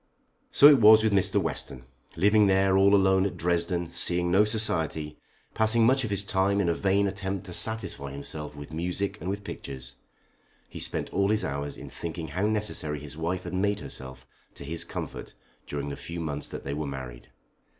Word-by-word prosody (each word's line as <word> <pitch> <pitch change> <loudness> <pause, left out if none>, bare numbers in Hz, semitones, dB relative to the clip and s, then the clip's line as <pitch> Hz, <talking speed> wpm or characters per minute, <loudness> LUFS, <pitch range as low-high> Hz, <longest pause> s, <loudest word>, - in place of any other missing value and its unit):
So 145 - +8
it 145 -3 +7
was 110 +1 +8
with 110 -2 +2
Mr. 95 -2 +3
Western. 65 - -4 0.3
Living 105 +4 +4
there 95 0 +3
all 100 +1 +5
alone 95 -1 +4
at - - -7
Dresden, 85 0 -1
seeing 85 0 +1
no 100 +4 +5
society, 80 -8 -1 0.3
passing 110 +1 +3
much 130 +2 +4
of 115 - -3
his 100 -1 0
time 100 0 +1
in 100 - +1
a 85 - +2
vain 100 +3 +1
attempt 95 0 -3
to 90 - -8
satisfy 110 -10 -1
himself 75 +2 -5
with 75 +1 -10
music 90 +4 -3
and 90 - -4
with 100 +1 -4
pictures, 65 -7 -8 0.7
he - - -9
spent - - -3
all 100 0 +2
his 110 0 +1
hours 70 +1 -4
in - - -10
thinking 80 -1 -6
how 95 +8 -1
necessary 105 -8 -2
his 75 0 -9
wife 85 +3 -3
had - - -7
made 100 +2 0
herself 65 -7 -6 0.3
to 70 - -8
his 85 +3 -3
comfort - - -7 0.3
during 70 0 -4
the 70 - -5
few 85 +1 -7
months 75 -3 -4
that - - -7
they 70 - -4
were 75 0 -3
married. 65 -3 -8
90 Hz, 190 wpm, -27 LUFS, 75-100 Hz, 0.7 s, So